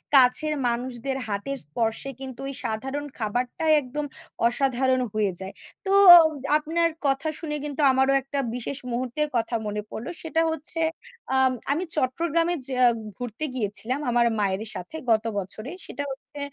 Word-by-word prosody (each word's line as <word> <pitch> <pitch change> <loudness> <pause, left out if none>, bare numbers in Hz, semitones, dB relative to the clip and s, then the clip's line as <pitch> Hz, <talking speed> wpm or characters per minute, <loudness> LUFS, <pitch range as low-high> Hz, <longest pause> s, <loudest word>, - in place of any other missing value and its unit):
কাছের 270 +4 +5
মানুষদের 245 +2 -2
হাতের 210 +7 -3
স্পর্শে 225 - -2
কিন্তু 260 -2 -8
ওই 275 - -4
সাধারণ 265 +6 -3
খাবারটাই 245 +7 -1
একদম 285 +3 -4 0.4
অসাধারণ 260 +1 +1
হয়ে 210 -3 +1
যায়। 190 +1 -7 0.3
তো 385 - 0 0.7
আপনার 330 +2 +1 0.2
কথা 270 +3 +1
শুনে 300 -3 -3
কিন্তু 295 0 -2
আমারও 265 +1 +3
একটা 275 +1 -3 0.2
বিশেষ 250 +2 -4
মুহূর্তের 255 +5 -1
কথা 235 0 0
মনে 210 0 -2
পড়লো। 235 - -6
সেটা 325 0 0
হচ্ছে 320 +1 -1 0.5
আ 265 - +3 0.3
আমি 310 +6 0
চট্টগ্রামে 330 +5 +1
যা 255 -1 0 0.4
ঘুরতে 245 +4 -4
গিয়েছিলাম। 230 +3 -2
আমার 240 0 +3
মায়ের 200 0 0
সাথে 180 - -7 0.2
গত 220 -1 +3
বছরে। 215 +7 -5
সেটা 285 - -5
হচ্ছে 275 +2 -10
260 Hz, 140 wpm, -25 LUFS, 230-290 Hz, 0.7 s, কাছের